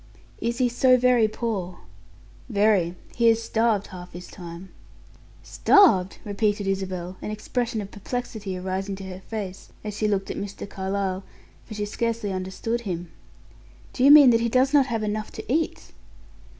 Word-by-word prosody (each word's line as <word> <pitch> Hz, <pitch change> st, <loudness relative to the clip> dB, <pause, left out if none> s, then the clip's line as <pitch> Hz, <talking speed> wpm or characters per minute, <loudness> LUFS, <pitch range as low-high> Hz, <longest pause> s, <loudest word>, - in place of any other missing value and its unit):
"Is 235 Hz, +1 st, -2 dB
he 255 Hz, -1 st, +3 dB
so 255 Hz, +1 st, +4 dB
very 250 Hz, -3 st, +4 dB
poor?" 210 Hz, -5 st, -3 dB, 0.7 s
"Very. 200 Hz, -5 st, +2 dB, 0.2 s
He 235 Hz, -1 st, +4 dB
is 225 Hz, 0 st, +2 dB
starved 225 Hz, -3 st, +1 dB
half 180 Hz, -1 st, -9 dB
his 175 Hz, +1 st, -8 dB
time." 175 Hz, +1 st, -9 dB, 0.7 s
"Starved!" 200 Hz, -, +4 dB
repeated 205 Hz, 0 st, 0 dB
Isabel, 185 Hz, -2 st, -3 dB
an -, -, -5 dB
expression 225 Hz, +1 st, -2 dB
of 200 Hz, -, -8 dB
perplexity 210 Hz, -3 st, -5 dB
arising 190 Hz, +2 st, -3 dB
to 195 Hz, -, -9 dB
her 185 Hz, -1 st, -7 dB
face 200 Hz, -4 st, -6 dB
as 210 Hz, -1 st, -5 dB
she 215 Hz, +1 st, 0 dB
looked 195 Hz, -2 st, -1 dB
at -, -, -5 dB
Mr. 200 Hz, 0 st, -6 dB
Carlyle, 190 Hz, -1 st, -3 dB, 0.4 s
for 215 Hz, -, -8 dB
she 210 Hz, 0 st, -2 dB
scarcely 230 Hz, -1 st, -2 dB
understood 190 Hz, +5 st, -3 dB
him. 175 Hz, -5 st, -5 dB, 0.8 s
"Do 255 Hz, -, -1 dB
you 275 Hz, -, +7 dB
mean 290 Hz, -3 st, +10 dB
that 230 Hz, 0 st, +3 dB
he 235 Hz, -, +1 dB
does 260 Hz, +4 st, +2 dB
not 280 Hz, -2 st, +5 dB
have 225 Hz, -4 st, -2 dB
enough 215 Hz, 0 st, -3 dB
to -, -, -7 dB
eat?" 320 Hz, +1 st, -2 dB
210 Hz, 165 wpm, -25 LUFS, 190-235 Hz, 0.8 s, mean